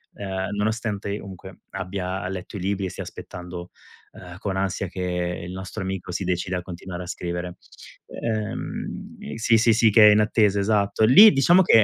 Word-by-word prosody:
uhm, 95 Hz, 0 st, -4 dB
nonostante 105 Hz, -1 st, -2 dB
comunque 95 Hz, -2 st, -11 dB
abbia 95 Hz, -1 st, -4 dB
letto 95 Hz, +2 st, -6 dB
i -, -, -6 dB
libri, 100 Hz, 0 st, -1 dB
e -, -, -5 dB
stia -, -, -6 dB
aspettando, 90 Hz, -1 st, -9 dB, 0.4 s
uhm, 90 Hz, -1 st, -11 dB
con 95 Hz, -3 st, -3 dB
ansia 95 Hz, 0 st, -1 dB
che 90 Hz, -1 st, -3 dB
il 90 Hz, -, -7 dB
nostro 95 Hz, 0 st, -6 dB
amico 95 Hz, -1 st, -4 dB
si 95 Hz, +1 st, -3 dB
decida 90 Hz, 0 st, -1 dB
a -, -, -3 dB
continuare 90 Hz, 0 st, -7 dB
a -, -, -10 dB
scrivere. 85 Hz, 0 st, -4 dB, 0.5 s
Uhm, 110 Hz, -8 st, -5 dB
sì, 115 Hz, 0 st, +3 dB
sì, 115 Hz, +1 st, +4 dB
sì, 110 Hz, 0 st, +4 dB
che 105 Hz, 0 st, +8 dB
è -, -, +7 dB
in 105 Hz, -, +5 dB
attesa, 105 Hz, -2 st, +2 dB
esatto. 100 Hz, +1 st, +2 dB
Lì, 200 Hz, -, +9 dB
diciamo 175 Hz, +8 st, +5 dB
che 115 Hz, -, +6 dB
95 Hz, 180 wpm, -24 LUFS, 90-105 Hz, 0.5 s, Lì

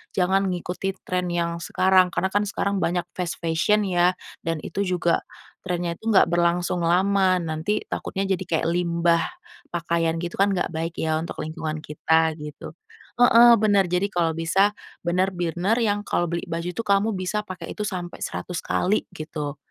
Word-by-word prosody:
jangan 190 Hz, +1 st, +2 dB
ngikuti 180 Hz, +2 st, -3 dB
tren 180 Hz, -1 st, -1 dB
yang 170 Hz, -1 st, -2 dB
sekarang, 185 Hz, +2 st, +3 dB
karena 190 Hz, +1 st, -1 dB
kan 205 Hz, -, +3 dB
sekarang 200 Hz, -2 st, -1 dB
banyak 175 Hz, +1 st, 0 dB
fast 180 Hz, -2 st, -3 dB
fashion 175 Hz, +6 st, +1 dB
ya, 180 Hz, -1 st, +2 dB, 0.3 s
dan 165 Hz, -1 st, -2 dB
itu 200 Hz, -, -3 dB
juga 180 Hz, -3 st, +1 dB, 0.4 s
trennya 175 Hz, -2 st, -2 dB
itu 225 Hz, -, -3 dB
nggak 205 Hz, -, +6 dB
berlangsung 175 Hz, +1 st, +1 dB
lama, 185 Hz, +2 st, +3 dB
nanti 165 Hz, +5 st, -2 dB
takutnya 195 Hz, 0 st, -3 dB
jadi 185 Hz, -, -3 dB
kayak 160 Hz, -1 st, +1 dB
limbah 170 Hz, -1 st, +2 dB, 0.5 s
pakaian 170 Hz, -1 st, 0 dB
gitu 170 Hz, +1 st, -4 dB
kan, 200 Hz, +1 st, +4 dB
nggak 175 Hz, -1 st, -2 dB
baik 165 Hz, +1 st, -3 dB
ya, 160 Hz, 0 st, 0 dB
untuk 170 Hz, -, -6 dB
lingkungan 155 Hz, 0 st, -4 dB
kita, 160 Hz, +1 st, +2 dB
gitu. 150 Hz, -1 st, -8 dB, 0.5 s
Heeh, 240 Hz, 0 st, +8 dB
bener, 200 Hz, -3 st, +4 dB
jadi 180 Hz, +3 st, 0 dB
kalau 170 Hz, -4 st, 0 dB
bisa 190 Hz, +5 st, +2 dB, 0.3 s
bener-bener 180 Hz, +3 st, 0 dB
yang 205 Hz, -3 st, +1 dB
kalau 175 Hz, -4 st, 0 dB
beli 170 Hz, 0 st, -2 dB
baju 170 Hz, +1 st, -3 dB
tuh, 230 Hz, +6 st, -4 dB
kamu 200 Hz, +2 st, +3 dB
bisa 195 Hz, +3 st, -2 dB
pakai 180 Hz, -4 st, -8 dB
itu 210 Hz, -, -2 dB
sampai 180 Hz, -4 st, -5 dB
100 180 Hz, -2 st, -5 dB
kali 200 Hz, +4 st, +1 dB
gitu. 150 Hz, -2 st, -5 dB
180 Hz, 165 wpm, -24 LUFS, 170-195 Hz, 0.5 s, Heeh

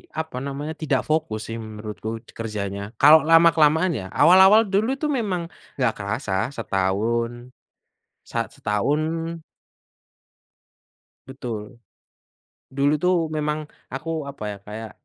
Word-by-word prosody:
apa 160 Hz, -5 st, -4 dB
namanya, 140 Hz, +3 st, -5 dB
tidak 135 Hz, -5 st, 0 dB
fokus 115 Hz, -9 st, -2 dB
sih 115 Hz, -, -4 dB
menurutku 110 Hz, +1 st, -7 dB
kerjanya 105 Hz, -1 st, -5 dB
kalau 150 Hz, +6 st, +8 dB
lama-kelamaan 165 Hz, +1 st, +5 dB
ya. 110 Hz, -, -4 dB
Awal-awal 190 Hz, +5 st, +7 dB
dulu 220 Hz, +7 st, +1 dB
itu 300 Hz, +2 st, -2 dB
memang 185 Hz, -10 st, -2 dB, 0.2 s
enggak 125 Hz, -5 st, +1 dB
kerasa, 100 Hz, -1 st, -2 dB
setahun 115 Hz, +5 st, -1 dB, 0.7 s
sa -, -, -2 dB
setahun 155 Hz, +10 st, -2 dB, 1.9 s
Betul. 120 Hz, -5 st, -5 dB, 1.2 s
Dulu 140 Hz, +2 st, +3 dB
itu 180 Hz, -, +1 dB, 0.3 s
memang 150 Hz, 0 st, -1 dB, 0.3 s
aku, 155 Hz, +5 st, -5 dB, 0.2 s
apa 140 Hz, -, -12 dB
ya, 100 Hz, -, -8 dB
kayak, 110 Hz, +1 st, -7 dB
135 Hz, 110 wpm, -23 LUFS, 110-160 Hz, 1.9 s, kalau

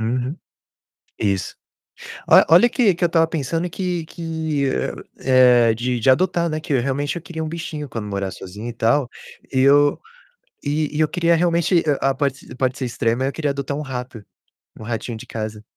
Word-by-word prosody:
Uhum. 125 Hz, +6 st, -2 dB, 0.8 s
Isso. 100 Hz, -3 st, -1 dB, 0.7 s
Olha -, -, +7 dB
olha 180 Hz, +9 st, +7 dB
que 230 Hz, -6 st, +3 dB
que 175 Hz, -, -4 dB
eu -, -, +5 dB
estava 165 Hz, -1 st, +3 dB
pensando 165 Hz, +3 st, -2 dB
que 175 Hz, -2 st, -3 dB
que, 160 Hz, -4 st, -3 dB
eh, 65 Hz, -, -1 dB, 0.8 s
eh, -, -, 0 dB
de 120 Hz, +2 st, -2 dB
de 125 Hz, -, +2 dB
adotar, 170 Hz, +3 st, +2 dB
né, 155 Hz, 0 st, -2 dB
que 155 Hz, -2 st, -4 dB
eu 125 Hz, -, +2 dB
realmente 140 Hz, +4 st, -2 dB
eu 170 Hz, -, -5 dB
queria 165 Hz, -2 st, -6 dB
um 155 Hz, -, -4 dB
bichinho 160 Hz, -3 st, -6 dB
quando 110 Hz, -4 st, -5 dB
morar 100 Hz, -2 st, -3 dB
sozinho 105 Hz, +5 st, -8 dB
e -, -, -6 dB
tal, 120 Hz, +3 st, +1 dB, 0.4 s
e 130 Hz, -, +3 dB
eu 145 Hz, +1 st, +4 dB, 0.6 s
e 150 Hz, +1 st, -1 dB
e -, -, -1 dB
eu 155 Hz, -, +4 dB
queria 170 Hz, +1 st, +2 dB
realmente, 170 Hz, 0 st, +2 dB, 0.2 s
ah, 135 Hz, 0 st, +2 dB
pode 135 Hz, -1 st, -1 dB
ser -, -, -12 dB
pode 130 Hz, 0 st, -1 dB
ser 130 Hz, -, -3 dB
extrema 120 Hz, +1 st, -1 dB
eu 135 Hz, -, 0 dB
queria 150 Hz, -3 st, -1 dB
adotar 140 Hz, +1 st, -4 dB
um -, -, -3 dB
rato, 125 Hz, -5 st, -6 dB, 0.6 s
um -, -, -9 dB
ratinho 115 Hz, 0 st, -4 dB
de -, -, -10 dB
casa. 110 Hz, -1 st, -5 dB
140 Hz, 195 wpm, -21 LUFS, 120-165 Hz, 0.8 s, Olha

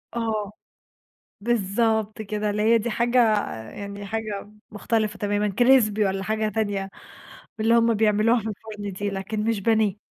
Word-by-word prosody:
آه. 220 Hz, -3 st, -2 dB, 0.9 s
بالضبط 220 Hz, 0 st, 0 dB
كده 210 Hz, 0 st, -2 dB
اللي 210 Hz, +1 st, -1 dB
هي 230 Hz, +2 st, +5 dB
دي 235 Hz, +2 st, -3 dB
حاجة 235 Hz, +2 st, +1 dB, 0.5 s
يعني 200 Hz, 0 st, -7 dB
حاجة 215 Hz, -1 st, -3 dB
م 210 Hz, +1 st, -19 dB
مختلفة 215 Hz, 0 st, -1 dB
تمامًا 205 Hz, 0 st, 0 dB
crispy 240 Hz, -5 st, +5 dB
والّا 195 Hz, 0 st, -2 dB
حاجة 215 Hz, 0 st, 0 dB
تانية 205 Hz, -2 st, -2 dB, 0.7 s
من 215 Hz, -, -1 dB
اللي 230 Hz, -, +4 dB
هُم 230 Hz, 0 st, +3 dB
بيعملوها 215 Hz, +2 st, +3 dB
في 220 Hz, -, -6 dB
الفُرن 210 Hz, -1 st, -7 dB
دي، 205 Hz, +2 st, -3 dB
لكن 200 Hz, +2 st, -3 dB
مش 225 Hz, -1 st, 0 dB
بانيه. 215 Hz, -2 st, +2 dB
215 Hz, 155 wpm, -24 LUFS, 205-225 Hz, 0.9 s, هي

